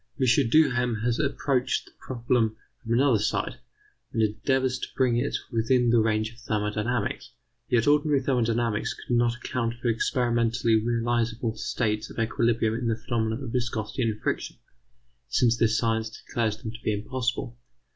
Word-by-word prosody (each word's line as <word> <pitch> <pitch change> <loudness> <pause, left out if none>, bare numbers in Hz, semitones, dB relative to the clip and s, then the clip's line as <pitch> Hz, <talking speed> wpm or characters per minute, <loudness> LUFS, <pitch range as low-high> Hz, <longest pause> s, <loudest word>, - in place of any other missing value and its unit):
M. 130 -1 +3
Duhem 125 -4 +3
has 120 -1 +1
approached 140 -3 0
the - - -18
problem 120 -3 0 0.3
from 115 -2 -2
another 125 -2 +4
side, 105 0 -1 0.5
and 115 - +1
endeavours 130 +4 0
to - - -4
bring 125 -3 +2
it 120 - 0
within 120 +1 +2
the 120 - +5
range 110 0 +1
of 120 - -17
thermodynamics. 105 +1 -2 0.4
Yet 115 -2 +3
ordinary 145 -1 +3
thermodynamics 120 -4 0
could 120 - -3
not 120 0 +2
account 120 -1 -2
for 120 0 -2
experimentally 115 0 +1
realizable 115 -1 0
states 110 -1 -1
of - - -12
equilibrium 115 -1 +1
in 115 +1 -2
the 115 - +1
phenomena 115 +1 -2
of 120 - -5
viscosity 115 -1 -2
and 110 -3 0
friction, - - -2 0.7
since 120 -2 +3
this 110 -2 +2
science 110 -1 0
declares 110 0 -2
them 110 -1 -6
to 115 +1 -11
be 110 - 0
impossible. 120 +2 -3
115 Hz, 155 wpm, -26 LUFS, 110-125 Hz, 0.7 s, the